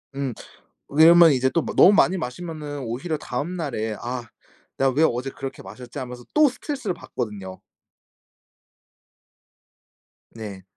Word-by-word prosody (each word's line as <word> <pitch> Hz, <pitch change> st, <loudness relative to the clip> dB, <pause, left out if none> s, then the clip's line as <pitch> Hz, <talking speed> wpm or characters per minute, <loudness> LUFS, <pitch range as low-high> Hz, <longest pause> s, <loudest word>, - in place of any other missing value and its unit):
음. 135 Hz, -3 st, -2 dB, 0.6 s
왜냐하면 165 Hz, +2 st, +7 dB
이제 130 Hz, 0 st, +2 dB
또 170 Hz, -, +1 dB
마 -, -, -4 dB
너무 195 Hz, -, +8 dB
많이 190 Hz, -2 st, +4 dB
마시면은 150 Hz, 0 st, -6 dB
오히려 130 Hz, +8 st, -3 dB
다음 145 Hz, +6 st, -4 dB
날에 110 Hz, -9 st, -3 dB
'아 125 Hz, 0 st, -4 dB, 0.5 s
내가 135 Hz, 0 st, +2 dB
왜 150 Hz, +5 st, +2 dB
어제 125 Hz, +3 st, -3 dB
그렇게 135 Hz, 0 st, -7 dB
마셨지.' 120 Hz, +6 st, -10 dB
하면서 125 Hz, -1 st, -7 dB
또 300 Hz, -1 st, +6 dB
스트레스를 260 Hz, -, -4 dB
받거든요. 105 Hz, -, -6 dB, 2.7 s
네. 105 Hz, -4 st, -9 dB
135 Hz, 280 characters per minute, -23 LUFS, 120-165 Hz, 2.7 s, 너무